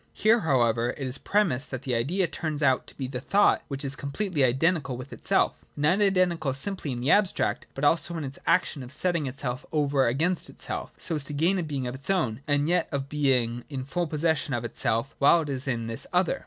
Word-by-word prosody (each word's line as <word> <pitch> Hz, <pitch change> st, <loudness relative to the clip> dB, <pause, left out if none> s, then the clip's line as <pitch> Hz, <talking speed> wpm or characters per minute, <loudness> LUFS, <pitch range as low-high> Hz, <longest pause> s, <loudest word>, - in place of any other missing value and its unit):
Here 225 Hz, +2 st, +4 dB
however 120 Hz, -, +1 dB
it 135 Hz, -, -4 dB
is 130 Hz, +2 st, -3 dB
premised 180 Hz, -11 st, +1 dB
that 130 Hz, -1 st, -5 dB
the 130 Hz, -, -2 dB
Idea 155 Hz, +12 st, +1 dB
turns 155 Hz, -3 st, -3 dB
out 130 Hz, -2 st, +2 dB
to -, -, -13 dB
be 135 Hz, -, -3 dB
the 125 Hz, 0 st, -4 dB
thought 200 Hz, +10 st, +3 dB
which 140 Hz, 0 st, -4 dB
is 135 Hz, +1 st, 0 dB
completely 145 Hz, +3 st, -1 dB
identical 135 Hz, +1 st, +1 dB
with 130 Hz, +2 st, -9 dB
itself, -, -, +2 dB, 0.2 s
and 145 Hz, -, -4 dB
not 180 Hz, +7 st, +3 dB
identical 175 Hz, -8 st, +1 dB
simply 185 Hz, 0 st, -4 dB
in 120 Hz, -1 st, -4 dB
the 135 Hz, -, +2 dB
abstract, 205 Hz, -2 st, +1 dB
but 135 Hz, -, -5 dB
also 165 Hz, +3 st, +2 dB
in 160 Hz, -, -3 dB
its 140 Hz, +5 st, -7 dB
action 165 Hz, -4 st, +2 dB
of 125 Hz, 0 st, -9 dB
setting 170 Hz, -1 st, 0 dB
itself 130 Hz, -1 st, -4 dB
over 145 Hz, -4 st, +2 dB
against 160 Hz, +9 st, 0 dB
itself, -, -, -5 dB
so -, -, -4 dB
as 150 Hz, -3 st, 0 dB
to 145 Hz, -, -3 dB
gain 170 Hz, +6 st, +2 dB
a -, -, 0 dB
being 140 Hz, -4 st, -3 dB
of 125 Hz, -, -3 dB
its 135 Hz, +5 st, -5 dB
own, 135 Hz, -, 0 dB
and 145 Hz, 0 st, +2 dB
yet 175 Hz, 0 st, +1 dB
of 140 Hz, -1 st, -3 dB
being 125 Hz, -5 st, +1 dB
in 135 Hz, -3 st, -5 dB
full 175 Hz, +5 st, -2 dB
possession 155 Hz, -3 st, 0 dB
of 120 Hz, 0 st, -3 dB
itself 115 Hz, +2 st, -1 dB
while 155 Hz, +4 st, +6 dB
it 150 Hz, -, -5 dB
is 135 Hz, 0 st, -3 dB
in 120 Hz, -3 st, -1 dB
this 115 Hz, 0 st, -1 dB
other. 180 Hz, +8 st, +1 dB
145 Hz, 225 wpm, -27 LUFS, 130-170 Hz, 0.2 s, while